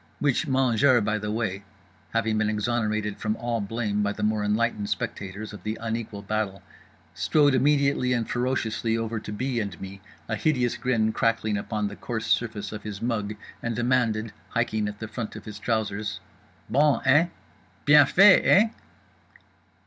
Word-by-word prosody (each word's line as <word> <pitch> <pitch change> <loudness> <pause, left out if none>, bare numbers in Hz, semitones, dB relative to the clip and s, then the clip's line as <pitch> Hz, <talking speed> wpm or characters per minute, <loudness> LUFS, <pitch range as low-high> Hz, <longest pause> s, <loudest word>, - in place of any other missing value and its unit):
Which 145 -4 +1
mangeur, 130 -1 +4
by 105 +1 0
the 105 0 -4
way 105 -3 -2 0.5
(having 110 -1 0
been 110 -1 +1
exonerated 110 -1 -1
from 110 -1 -1
all 120 -1 -2
blame 105 0 -2
by 100 0 0
the - - -5
more 105 0 +1
enlightened 105 0 0
spectators 100 +2 -4
of 105 - -9
the 110 +3 -3
unequal 110 -3 -4
battle) 105 -2 -2 0.5
strode 145 -3 +3
immediately 140 -1 +2
and 120 -3 0
ferociously 120 -2 -1
over 115 0 -2
to 105 - -8
B. 125 +3 -2
and 100 -5 -4
me, 95 0 -8 0.3
a 110 - -1
hideous 125 -1 +1
grin 110 -4 0
crackling 115 -2 +1
upon 105 +1 -2
the 100 - -7
coarse 110 -1 -4
surface 105 -4 -1
of 105 -1 -6
his 105 -2 -6
mug, 105 -3 -2 0.3
and 120 -1 -2
demanded—hiking 115 -2 0
at 105 0 -6
the 110 - -6
front 110 0 -6
of - - -9
his 105 -1 -8
trousers— 105 -2 -2 0.5
"_Bon, 145 +1 +3
eh? 145 +6 +5 0.6
Bien 145 -1 +7
fait, 195 +4 +7
eh? 215 +4 +5
110 Hz, 160 wpm, -26 LUFS, 105-120 Hz, 0.6 s, Bien